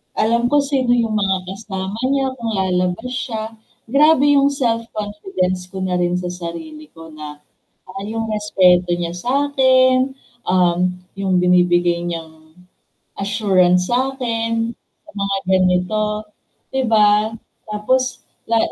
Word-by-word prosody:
Alam 235 +2 +2
ko 290 - +5
sino 270 -3 0
yung 225 -2 0
mga 195 -2 +1
kasama 195 -1 -5 0.2
niya 270 -1 +1
kung 230 -2 -4
lalabas 185 +4 -1
siya, 225 -2 -4 0.3
grabe 290 +3 +4
yung 280 0 +4
self-confidence 210 -7 -2
ko 190 - -6
na 185 -1 -1
rin 180 0 0
sa 180 - -4
sarili 300 - -8
ko 165 0 -12
na, 150 -1 -9 0.5
ah, 195 +1 -7
yung 225 0 -3
respeto 180 -4 +3
niya 170 -1 -3
sa'kin, 260 +2 +2 0.3
um, 180 0 +2 0.2
yung 190 -2 +1
binibigay 175 -1 +3
niyang 160 -2 -8 0.7
assurance 190 -3 +2
sa'kin, 235 -3 -1 0.3
sa - - -18
mga 200 -1 -1
ganito, 190 +4 +1 0.5
'di 265 0 +1
ba? 210 0 +4 0.4
Tapos 250 +5 -1 0.2
la 230 - +3
210 Hz, 120 wpm, -19 LUFS, 180-240 Hz, 0.7 s, ko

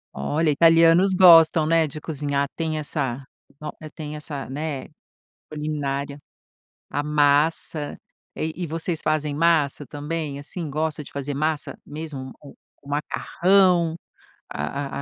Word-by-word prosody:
Olha, 155 +1 0
italianos 165 +4 +5
gostam, 165 -3 +7
né, 165 0 +3
de 155 +1 -7
cozinhar, 145 -2 -2
tem 160 -1 -2
essa 135 -4 -2 0.3
no 150 - -6 0.2
tem 150 -2 -6
essa, 150 -2 -6
né, 145 0 -4 0.7
culinária, 145 -2 -3 0.7
a 145 - -2
massa, 150 +1 +2 0.4
eh 160 - -2
e 180 - -4
vocês 165 +1 -3
fazem 150 -1 0
massa 150 -3 +2
também? 150 0 -5
Assim, 160 +3 -6
gosta 155 +1 -2
de - - -13
fazer 140 0 -4
massa 155 -1 -2
mesmo, 145 -4 -7
o 145 - -13 0.3
o 140 - -14
macarrão, 175 +3 +2 0.5
a 140 0 -4
150 Hz, 125 wpm, -23 LUFS, 145-165 Hz, 0.7 s, gostam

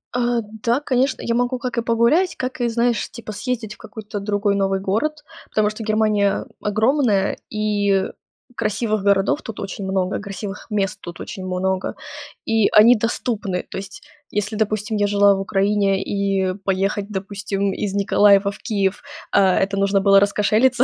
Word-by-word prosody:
Э, 240 -1 +1 0.2
да, 240 +3 +2
конечно, 260 -2 0
я 230 - -1
могу 245 +1 0
как 250 -2 -4
и - - +2
погулять, 235 +11 +2
как 255 -1 -4
и 240 - +2
знаешь, 235 0 0
типа 230 -2 -8
съездить 220 -1 -4
в - - -26
какой-то 210 0 -7
другой 205 0 0
новый 195 -1 +1
город. 295 +11 -1 0.3
Потому 215 -1 +2
что 215 +1 -7
Германия 215 -2 +1 0.2
огромная, 215 -1 +1
и 205 -2 +1 0.5
красивых 215 -1 -1
городов 200 +8 +2
тут 225 -3 -8
очень 195 0 -5
много, 190 0 -1
красивых 200 0 -7
мест 200 -3 -1
тут 175 0 -9
очень 190 - -7
много, 185 +1 -1 0.5
и 225 -2 +3
они 230 +4 +7
доступны. 215 -4 -2
То - - -6
есть, 195 0 -8 0.3
если, 210 +1 -2
допустим, 215 0 -1
я 205 - +2
жила 200 -1 +4
в 195 - -3
Украине, 195 0 +1
и 195 -2 0
поехать, 195 +1 0
допустим, 200 0 -3
из 200 -2 -3
Николаева 200 0 +4
в 200 - -12
Киев, 200 -1 -1 0.3
а, 195 -2 +4
это 195 +1 0
нужно 195 0 +2
было 195 0 +6
раскошелиться 215 +5 +3
205 Hz, 160 wpm, -21 LUFS, 195-230 Hz, 0.5 s, они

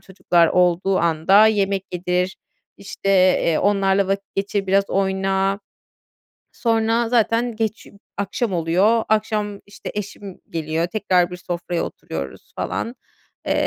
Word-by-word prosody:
çocuklar 175 -3 +2
olduğu 180 +1 +2
anda 170 +6 +4
yemek 195 -3 +1
yedir, 180 +1 -1 0.4
işte, 195 0 -6 0.3
eee, 165 - +2
onlarla 195 -1 +2
vakit 195 0 -3
geçir, 195 0 -2
biraz 195 +1 +2
oyna. 195 +1 0 0.9
Sonra 225 0 +1
zaten 235 0 +1
geç 220 -1 -3
ü - - -15 0.3
akşam 200 +1 -2
oluyor. 185 +7 +2
Akşam, 210 -1 0
işte, 200 - -9
eşim 205 -2 -7
geliyor 160 +1 -2
tekrar; 180 -3 +1
bir 180 - -6
sofraya 175 -1 -3
oturuyoruz 70 -1 -7
falan. 235 +3 -3 0.5
Eee, - - +2
195 Hz, 125 wpm, -21 LUFS, 180-210 Hz, 0.9 s, anda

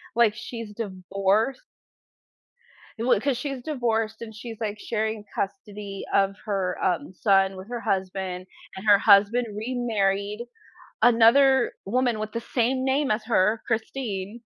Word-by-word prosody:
like, 235 -3 +4
she's 230 -1 -7
divorced 200 +3 -1 1.4
i - - -3
w 240 -4 +3
'cause 275 +1 0
she's 270 0 -4
divorced 225 -6 -1
and 220 -1 -8
she's, 225 0 -8
like, 210 -1 -3
sharing 220 -1 -2
custody 200 -1 -5
of 195 0 +3
her, 190 -3 -1
um, 180 0 0
son 195 0 +3
with 185 +2 -10
her 240 -1 -4
husband, 185 -2 -2 0.3
and 190 +3 -8
her 205 -1 +7
husband 210 +4 +5
remarried 210 -2 -1 0.5
another 245 +2 +5
woman 245 +1 +1
with 215 0 -4
the 230 - -3
same 255 +2 0
name 270 +1 +1
as 215 0 0
her, 215 -1 +2
Christine, 225 -2 -3
220 Hz, 135 wpm, -25 LUFS, 200-240 Hz, 1.4 s, her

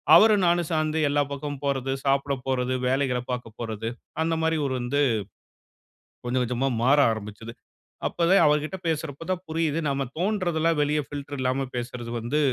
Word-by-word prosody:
அவரும் 210 +1 +6
நானும் 175 -1 +2
சேர்ந்து 155 -1 0
எல்லா 145 +1 +2
பக்கமும் 140 0 -5
போறது, 135 -1 0
சாப்பிட 140 +1 +2
போறது, 130 -1 0
வேலைகளை 130 -1 +1
பார்க்க 125 -2 -4
போறது 115 -1 -4 0.3
அந்த 165 0 +1
மாரி 160 0 +1
ஒரு 135 - -1
வந்து 125 +4 -1 1.3
கொஞ்சம் 125 +1 +1
கொஞ்சமா 125 +2 0 0.2
மாற 135 +4 +5
ஆரம்பிச்சது. 110 +1 -6 0.5
அப்பவே 175 +3 +3
அவர்கிட்ட 150 +4 +1
பேசுறப்ப 160 -1 -3
தான் 185 -1 -2
புரியுது, 160 -1 0
நாம 140 0 -1
தோன்றதெல்லாம் 175 -4 +1
வெளிய 150 +1 +1
ஃபில்டர் 145 0 -6
இல்லாம 130 +1 0
பேசுறது 120 -1 -5
வந்து 120 +7 -1
140 Hz, 150 wpm, -26 LUFS, 125-160 Hz, 1.3 s, அவரும்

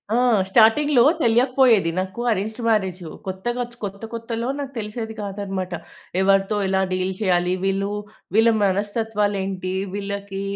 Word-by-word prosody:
ఆ! - - +3 0.3
స్టార్టింగ్‌లో 240 +5 +5 0.2
తెలియకపోయేది 240 -5 +4
నాకు 190 +5 -4
అరేంజ్డ్ 215 +3 -2
మ్యారేజు 190 -6 0 0.2
కొత్తగా, 240 +7 -2 0.2
కొత్త 200 0 -5
కొత్తలో 230 +1 -3
నాకు 275 -1 -5
తెలిసేది 220 +1 -5
కాదన్నమాట. 195 -2 -4 0.5
ఎవరితో 195 +2 +3
ఎలా 190 0 +1
డీల్ 185 +1 -1
చేయాలి? 180 -2 +2
వీళ్ళు 195 +1 0 0.5
వీళ్ళ 225 +1 +6
మనస్తత్వాలేంటి 200 -2 -1 0.2
వీళ్ళకి, 200 -1 -4
205 Hz, 115 wpm, -22 LUFS, 190-225 Hz, 0.5 s, వీళ్ళ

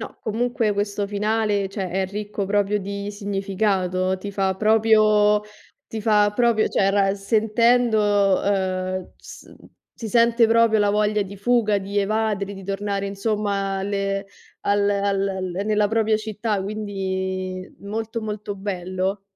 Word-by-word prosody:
No, - - -8
comunque 235 0 0
questo 205 0 -2
finale, 210 -1 0
cioè, 190 -2 -4
è 190 +1 0
ricco 205 0 -4
proprio 205 +1 +1
di 200 +1 -5
significato, 195 -2 -1
ti 200 +2 -7
fa 195 -1 0
proprio 215 0 +4 0.5
ti 220 - -5
fa 210 -1 +4
proprio 235 -1 +2
cioè, 195 0 +2
ra 195 -1 +2
sentendo 215 -1 +2
ehm 185 -2 -1
s - - -13 0.5
si 225 - -5
sente 235 +1 +4
proprio 225 -1 +4
la 205 -1 +3
voglia 210 0 +1
di 200 +1 -9
fuga, 215 -1 +2
di 200 +1 -3
evadere, 200 -1 -1
di 195 - -10
tornare, 200 +1 -2
insomma, 200 -1 -1
alle 195 0 -2 0.3
al 200 0 +1
al 200 -1 0 0.2
nella 210 -1 +2
propria 220 0 +2
città, 215 -1 -2
quindi 190 -2 -3
molto, 220 +3 -4
molto 210 -1 -5
bello. 190 0 -3
205 Hz, 135 wpm, -23 LUFS, 195-215 Hz, 0.5 s, proprio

